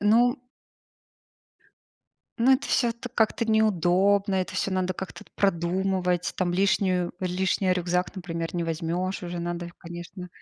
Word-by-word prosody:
Э, - - -5
ну 240 +5 +4 2.0
ну, 240 +3 +4
это 270 +2 +2
всё 240 -2 +2 0.2
как-то 225 0 +2
неудобно, 200 -2 +3
это 185 -1 -1
всё 195 - -1
надо 185 0 0
как-то 190 +1 -8
продумывать. 180 -1 +1
Там 180 -2 0
лишнюю 185 -1 +2
лишний 185 +1 +1
рюкзак, 180 +1 0
например, 165 -2 -4
не 170 - 0
возьмешь 170 +4 -2
уже 175 0 -4
надо 175 0 -3
конечно. 175 +1 -8
185 Hz, 125 wpm, -26 LUFS, 175-195 Hz, 2.0 s, ну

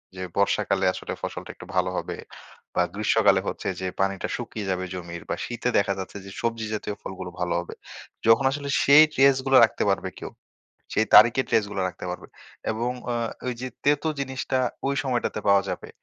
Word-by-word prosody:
যে 95 - -7 0.2
বর্ষাকালে 100 0 +2
আসলে - - -5
ফসলটা - - -5
একটু - - -11
ভালো 90 0 +2
হবে - - -3 0.6
বা - - +3
গ্রীষ্মকালে - - +3
হচ্ছে - - -4
যে, 95 - -2
পানিটা 95 0 0
শুকিয়ে 110 -4 -5
যাবে 95 0 -1
জমির 85 -2 -7
বা - - 0
শীতে 120 0 -2
দেখা 100 -1 +2
যাচ্ছে 95 +1 -6
যে 100 - -9
সবজি 115 -1 -1
জাতীয় 105 -1 -3
ফলগুলো 95 -1 -7
ভালো 90 -1 0
হবে। 85 - -7 0.5
যখন 115 +4 +5
আসলে 140 0 -4
সেই 145 +2 +8
ট্রেস 135 0 +5
গুলা 135 0 +5
রাখতে 110 - -3
পারবে 95 -1 0
কেউ। - - -7 0.6
সেই 110 - +2
তারিখের 120 +3 +7
ট্রেস 110 - +3
গুলা 100 -2 -2
রাখতে 90 - -9
পারবে 90 - -7 0.4
এবং 115 +3 -1 0.2
আ - - -1 0.3
ওই 125 - -1
যে 130 - -3 0.2
তেতো 145 +2 +2
জিনিসটা 130 -1 -2 0.3
ওই 140 - +1
সময়টাতে 125 -5 -1
পাওয়া 100 -1 +5
যাবে - - -5
110 Hz, 185 wpm, -25 LUFS, 95-130 Hz, 0.6 s, সেই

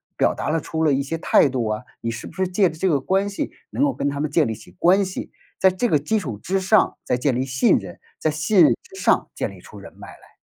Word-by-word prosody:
表 - - +2
达 - - -5
了 160 0 0
出 160 - -4
了 150 - +3
一 135 +1 +1
些 165 +4 -4
态 150 - +4
度 125 -3 -2
啊？ 110 0 -2 0.2
你 115 - -3
是 115 - -7
不 - - -12
是 190 -1 -1
借 185 0 +2
着 160 - -11
这 190 - 0
个 145 -6 +2
关 195 +7 0
系 200 - -4 0.2
能 280 - 0
够 285 - +2
跟 140 - -2
他 140 0 -2
们 155 - -2
建 155 -3 +3
立 110 - -3
起 90 - -15
关 190 +3 +4
系？ 185 -1 -6 0.3
在 190 - +6
这 185 +6 -1
个 150 - +3
基 185 +10 0
础 125 - -5
之 190 - -2
上， 215 +3 +3
再 125 - 0
建 125 0 0
立 130 +2 -1
信 130 0 +3
任， - - -10 0.2
在 155 - 0
信 165 +5 +3
任 - - +6
之 385 +1 -15
上 - - +2
建 - - -3
立 - - -13
出 - - -14
人 - - -11
脉 - - -11
来。 - - -15
160 Hz, 305 characters per minute, -22 LUFS, 135-190 Hz, 0.3 s, 在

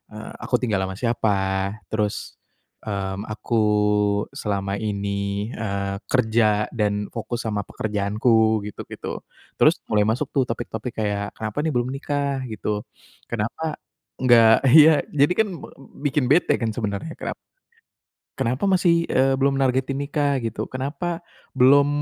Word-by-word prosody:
eee, - - -8
aku - - -1
tinggal 110 -5 +1
sama 95 - -6
siapa, 115 -3 +1 0.5
terus, 105 -2 -2 0.5
mmm, 100 0 -4
aku 115 +1 -1 0.7
selama 100 -1 -2
ini, 100 0 -2
eee, 100 -2 -3
kerja 110 -4 +2
dan 105 -3 -1
fokus 120 +1 -4
sama 105 -2 -1
pekerjaanku 110 +2 +1
gitu-gitu. 105 - -7 0.4
Terus - - +6
mulai 105 - +2
masuk 130 +6 -2
tuh 130 -5 +1
topik-topik 115 0 -5
kayak 105 -1 -2
kenapa 110 +5 -3
nih 160 - 0
belum 125 +2 0
nikah 140 -1 -2
gitu. 105 -1 -3 0.5
Kenapa 120 +8 -3 0.4
enggak 115 -1 +5
ya, 155 -1 +8
jadi 145 +4 +4
kan 220 - +3
me - - -9 0.4
bikin 140 -1 +1
bete 170 - +4
kan 115 -2 -2
sebenarnya, 105 +7 -3
kenap - - -4 1.0
kenapa 125 +8 -1
masih, 170 -3 +3
eee, 135 +1 +3
belum 135 0 +2
nargetin 135 +1 +1
nikah 145 0 0
gitu. 110 -1 -3
Kenapa 165 +7 -4 0.3
belum, 140 +3 +6
115 Hz, 130 wpm, -23 LUFS, 105-135 Hz, 1.0 s, ya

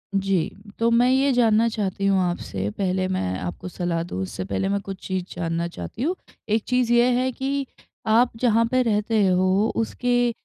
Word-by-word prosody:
जी, 195 -3 +1 0.3
तो 230 0 +3
मैं 240 +2 +4
ये 270 +1 +3
जानना 230 -1 +4
चाहती 200 -3 -2
हूँ 195 -1 +3
आपसे, 100 - -2
पहले 185 -1 0
मैं 95 - -2
आपको 90 - -6
सलाह 175 -2 -2
दूँ, 95 - -5
उससे 95 0 -4
पहले 100 - -1
मैं 200 0 +1
कुछ 195 -2 -8
चीज़ 185 -1 -1
जानना 170 0 -2
चाहती 215 +7 -6
हूँ। 350 +5 0 0.3
एक 220 0 +1
चीज़ 250 -2 +1
ये 240 0 +5
है 260 0 0
कि 275 +2 -2 0.4
आप 235 +3 +4
जहाँ 230 -1 +3
पे 255 0 +3
रहते 215 -1 +1
हो, 185 +3 +3
उसके 245 +1 +1
205 Hz, 185 wpm, -23 LUFS, 180-240 Hz, 0.4 s, ये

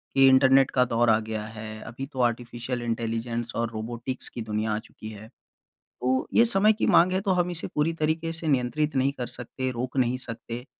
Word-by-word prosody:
कि 135 0 +6
इंटरनेट 135 0 +5
का 125 - +3
दौर 120 -1 +1
अ 110 0 +4
गया 110 -1 -4
है, 110 0 -8
अभी 125 +4 -7
तो 135 -2 -10
आर्टिफिशियल 120 +1 -2
इंटेलिजेंस 115 0 -3
और 115 0 -1
रोबोटिक्स 120 +3 -3
की 120 - -7
दुनिया 110 0 -2
आ - - 0
चुकी 110 0 -11
है। 110 0 -10 0.7
तो 130 +1 0
ये 230 - +6
समय 215 -1 +5
की 220 - -1
माँग 180 +2 +5
है, 190 - 0
तो 195 - 0
हम 180 -1 +1
इसे 170 - 0
पूरी 150 +2 +1
तरीके 160 +1 -1
से 165 0 -3
नियंत्रित 145 +2 0
नहीं 135 +1 +2
कर 125 - -3
सकते, 130 +2 -5
रोक 125 +2 -5
नहीं 125 -1 +2
सकते, 120 0 -7
125 Hz, 205 wpm, -26 LUFS, 115-140 Hz, 0.7 s, कि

